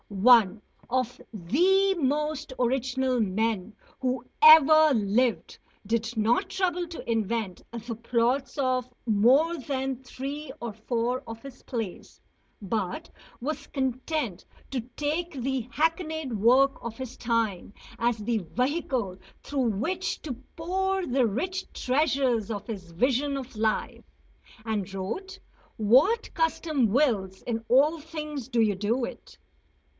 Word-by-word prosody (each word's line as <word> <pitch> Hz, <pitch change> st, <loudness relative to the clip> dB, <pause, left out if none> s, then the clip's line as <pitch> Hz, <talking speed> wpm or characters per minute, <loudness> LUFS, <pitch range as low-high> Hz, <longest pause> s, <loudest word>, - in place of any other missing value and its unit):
One 215 Hz, 0 st, +5 dB, 0.3 s
of 255 Hz, 0 st, -1 dB
the 360 Hz, -, +3 dB
most 300 Hz, 0 st, -1 dB
original 255 Hz, 0 st, +1 dB
men 215 Hz, 0 st, -1 dB, 0.3 s
who 255 Hz, -2 st, -1 dB, 0.2 s
ever 310 Hz, 0 st, +8 dB
lived 225 Hz, +3 st, +1 dB, 0.3 s
did 225 Hz, +2 st, -1 dB
not 220 Hz, +3 st, +2 dB
trouble 360 Hz, -2 st, 0 dB
to 335 Hz, -7 st, -9 dB
invent 220 Hz, -4 st, -1 dB
the 235 Hz, 0 st, -6 dB
plots 240 Hz, +5 st, 0 dB
of 255 Hz, -2 st, 0 dB
more 255 Hz, +10 st, +4 dB
than 265 Hz, -1 st, -3 dB
three 280 Hz, +4 st, -6 dB
or 235 Hz, -2 st, -5 dB
four 235 Hz, +3 st, -2 dB
of 225 Hz, 0 st, -8 dB
his 275 Hz, -2 st, -11 dB
plays, 225 Hz, -7 st, -6 dB, 0.4 s
but 210 Hz, -, -3 dB, 0.3 s
was 300 Hz, +6 st, -4 dB
content 260 Hz, -, -2 dB, 0.3 s
to 260 Hz, -3 st, -1 dB, 0.2 s
take 315 Hz, +4 st, -1 dB
the 260 Hz, -2 st, -2 dB
hackneyed 315 Hz, -2 st, -1 dB
work 255 Hz, +6 st, +3 dB
of 230 Hz, -1 st, -6 dB
his 260 Hz, -1 st, -6 dB
time 225 Hz, -6 st, -1 dB, 0.3 s
as 235 Hz, 0 st, +1 dB
the 220 Hz, +1 st, -1 dB
vehicle 250 Hz, -, -2 dB, 0.3 s
through 270 Hz, -4 st, 0 dB
which 330 Hz, -, -2 dB
to 290 Hz, -, -3 dB, 0.2 s
pour 380 Hz, +3 st, -1 dB
the 255 Hz, -3 st, +2 dB
rich 365 Hz, -, -3 dB
treasures 255 Hz, -5 st, +1 dB
of 205 Hz, -1 st, -5 dB
his 190 Hz, -6 st, -7 dB
vision 265 Hz, +9 st, +1 dB
of 265 Hz, -2 st, -8 dB
life. 215 Hz, 0 st, -1 dB, 0.6 s
And 205 Hz, -4 st, -2 dB
wrote: 370 Hz, -, -5 dB, 0.4 s
"What 260 Hz, -, +3 dB
custom 320 Hz, -5 st, +1 dB
wills 205 Hz, -6 st, +1 dB
in 225 Hz, -2 st, -3 dB
all 295 Hz, +6 st, +4 dB
things 300 Hz, -5 st, -6 dB
do 240 Hz, -, 0 dB
you 210 Hz, -3 st, +2 dB
do 225 Hz, +6 st, 0 dB
it." -, -, -11 dB
255 Hz, 125 wpm, -27 LUFS, 225-295 Hz, 0.6 s, ever